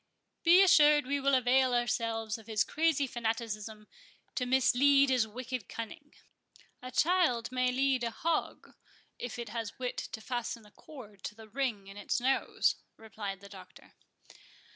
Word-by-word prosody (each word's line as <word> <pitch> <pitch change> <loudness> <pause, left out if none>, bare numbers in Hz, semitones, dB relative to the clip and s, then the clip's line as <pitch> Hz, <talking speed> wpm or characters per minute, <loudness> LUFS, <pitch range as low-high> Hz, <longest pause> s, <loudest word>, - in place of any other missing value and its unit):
"Be 355 +3 +7
assured 300 -5 +6
we 280 +2 -1
will 275 0 +2
avail 255 0 +3
ourselves 230 -2 -1
of 220 - -17
his 220 -2 +1
crazy 310 -3 +1
fanaticism 225 -3 -4 0.5
to 250 - -2
mislead 265 +2 +4
his 245 -4 +2
wicked 245 -1 -6
cunning;—a 255 -1 -11
child 280 -7 +2
may 255 0 +1
lead 265 -1 +1
a 235 - 0
hog, 320 +7 -3 0.5
if 245 -1 -5
it 235 -2 -6
has 225 -1 -5
wit 250 -1 -4
to - - -5
fasten 235 -1 -4
a 210 - -18
cord 215 -11 -13
to 210 - -6
the 220 0 -13
ring 225 -4 -2
in 195 +1 -12
its 205 - -1
nose," 265 +2 +1 0.2
replied 205 -3 -7
the 200 - -12
Doctor. - - -14
245 Hz, 150 wpm, -31 LUFS, 220-270 Hz, 0.5 s, Be